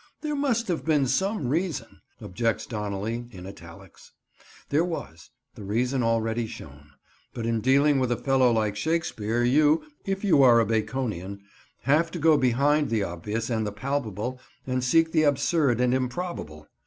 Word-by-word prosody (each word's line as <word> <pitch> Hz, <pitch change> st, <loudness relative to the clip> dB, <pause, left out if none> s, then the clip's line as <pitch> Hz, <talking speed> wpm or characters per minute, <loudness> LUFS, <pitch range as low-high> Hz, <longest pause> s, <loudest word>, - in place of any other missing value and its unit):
"There 300 Hz, -1 st, -2 dB
must 245 Hz, -5 st, 0 dB
have 175 Hz, -3 st, -2 dB
been 150 Hz, -4 st, +2 dB
some 190 Hz, -, 0 dB
reason," 165 Hz, +3 st, -3 dB, 0.2 s
objects 115 Hz, +5 st, -2 dB
Donnelly, 105 Hz, +2 st, -4 dB
in 90 Hz, -4 st, -10 dB
italics. 85 Hz, -4 st, -13 dB, 0.6 s
There 150 Hz, +3 st, +2 dB
was; 80 Hz, -, -6 dB, 0.2 s
the 110 Hz, -, -10 dB
reason 125 Hz, +6 st, 0 dB
already 115 Hz, 0 st, 0 dB
shown. 75 Hz, -6 st, -11 dB, 0.5 s
But 115 Hz, -, -4 dB
in 115 Hz, -1 st, 0 dB
dealing 140 Hz, +3 st, +3 dB
with 130 Hz, -2 st, 0 dB
a 120 Hz, -, +1 dB
fellow 135 Hz, -2 st, +3 dB
like 110 Hz, -3 st, 0 dB
Shakespeare 120 Hz, -5 st, -1 dB
you—if 155 Hz, -, +1 dB
you 175 Hz, -8 st, +4 dB
are 120 Hz, -3 st, +7 dB
a 115 Hz, -, +3 dB
Baconian—have 110 Hz, -, -2 dB
to 175 Hz, -, -6 dB
go 160 Hz, -1 st, +4 dB
behind 140 Hz, +3 st, +2 dB
the 110 Hz, -3 st, 0 dB
obvious 105 Hz, +7 st, -4 dB
and 110 Hz, -1 st, 0 dB
the -, -, -3 dB
palpable 125 Hz, 0 st, -3 dB, 0.2 s
and 130 Hz, -1 st, -1 dB
seek 160 Hz, +6 st, +3 dB
the 155 Hz, -, +3 dB
absurd 145 Hz, -3 st, +2 dB
and 125 Hz, 0 st, +2 dB
improbable. 130 Hz, -, -4 dB
125 Hz, 155 wpm, -26 LUFS, 110-150 Hz, 0.6 s, are